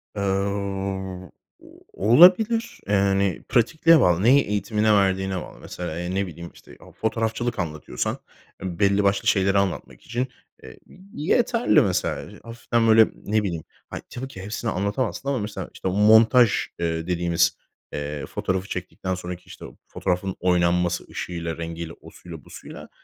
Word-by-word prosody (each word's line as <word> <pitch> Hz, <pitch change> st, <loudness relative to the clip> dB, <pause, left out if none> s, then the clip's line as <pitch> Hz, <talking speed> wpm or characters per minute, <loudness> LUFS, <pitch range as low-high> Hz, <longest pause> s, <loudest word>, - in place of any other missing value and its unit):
Iıı, 100 Hz, -, -3 dB, 0.3 s
ooo, 95 Hz, -2 st, -4 dB, 0.6 s
olabilir. 185 Hz, -, +5 dB
Yani, 100 Hz, -1 st, +1 dB
pratikliğe 160 Hz, +7 st, +4 dB
bağlı. 90 Hz, -2 st, +3 dB
Neyi 135 Hz, +4 st, +6 dB
eğitimine 105 Hz, +1 st, +1 dB
verdiğine 95 Hz, -1 st, +1 dB
bağlı. -, -, -11 dB
Mesela, 85 Hz, -2 st, -6 dB
ya, 90 Hz, 0 st, -4 dB
ne 95 Hz, +1 st, -1 dB
bileyim, 85 Hz, 0 st, -9 dB
işte, -, -, -16 dB
o -, -, -16 dB
fotoğrafçılık 115 Hz, 0 st, -2 dB
anlatıyorsan 75 Hz, -3 st, -3 dB, 0.4 s
belli 100 Hz, +2 st, +1 dB
başlı 100 Hz, 0 st, +1 dB
şeyleri 100 Hz, 0 st, +3 dB
anlatmak 100 Hz, -3 st, -2 dB
için, 120 Hz, +2 st, -3 dB, 0.4 s
e -, -, -10 dB
ı -, -, -15 dB
y 185 Hz, -4 st, -3 dB
yeterli, 240 Hz, -1 st, +3 dB
mesela. 95 Hz, 0 st, -1 dB
Y 105 Hz, -, -14 dB
hafiften 115 Hz, 0 st, -1 dB
böyle, 110 Hz, 0 st, +7 dB
ne 105 Hz, +1 st, -1 dB
bileyim. 85 Hz, -5 st, -3 dB, 0.3 s
Ha, -, -, -6 dB
tabii 130 Hz, +2 st, -6 dB
ki 95 Hz, -8 st, -10 dB
hepsini 110 Hz, +4 st, -4 dB
anlatamazsın 105 Hz, +7 st, -2 dB
ama 135 Hz, -3 st, 0 dB
mesela, 105 Hz, 0 st, -5 dB
işte, -, -, -5 dB
montaj, 110 Hz, +4 st, +5 dB, 0.3 s
ııı, 80 Hz, 0 st, -2 dB
dediğimiz, 85 Hz, -1 st, +1 dB, 0.4 s
eee, 75 Hz, -1 st, -4 dB
fotoğrafı 95 Hz, +1 st, -3 dB
çektikten 95 Hz, 0 st, -4 dB
sonraki, 90 Hz, -1 st, -7 dB
işte, -, -, -11 dB, 0.2 s
fotoğrafın 90 Hz, +1 st, -2 dB
oynanması 90 Hz, -1 st, +1 dB
ışığıyla, 85 Hz, -2 st, -5 dB
rengiyle, 85 Hz, 0 st, -6 dB
osuyla 85 Hz, -4 st, -12 dB
busuyla, -, -, -11 dB
100 Hz, 145 wpm, -24 LUFS, 90-115 Hz, 0.6 s, böyle